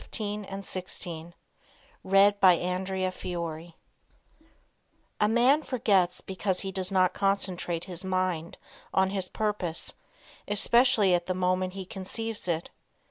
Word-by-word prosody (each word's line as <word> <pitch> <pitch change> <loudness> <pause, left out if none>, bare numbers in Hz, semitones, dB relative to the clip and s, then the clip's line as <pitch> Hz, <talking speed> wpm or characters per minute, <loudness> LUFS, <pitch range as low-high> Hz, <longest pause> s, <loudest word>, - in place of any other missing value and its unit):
CONCENTRATE 205 -2 -4 0.2
SO - - -5
YOU 165 +1 -8 0.7
WILL 195 +2 +5
NOT 185 +1 +2
FORGET 170 -2 -5 1.5
A 210 - +4
man 245 +7 +4
forgets 200 - +1
because 190 -1 -2
he 195 - -4
does 190 0 -3
not 185 -1 +3
concentrate 185 -4 -1
his 180 -2 -7
mind 185 -3 -1 0.4
on 190 0 +3
his 190 -2 -3
purpose, 205 -6 -2 0.5
especially 210 -1 +4
at 175 -1 +1
the 185 - -1
moment 185 0 0
he 190 -1 -6
conceives 210 +3 -5
it. 170 -1 -2
185 Hz, 120 wpm, -28 LUFS, 180-205 Hz, 1.5 s, WILL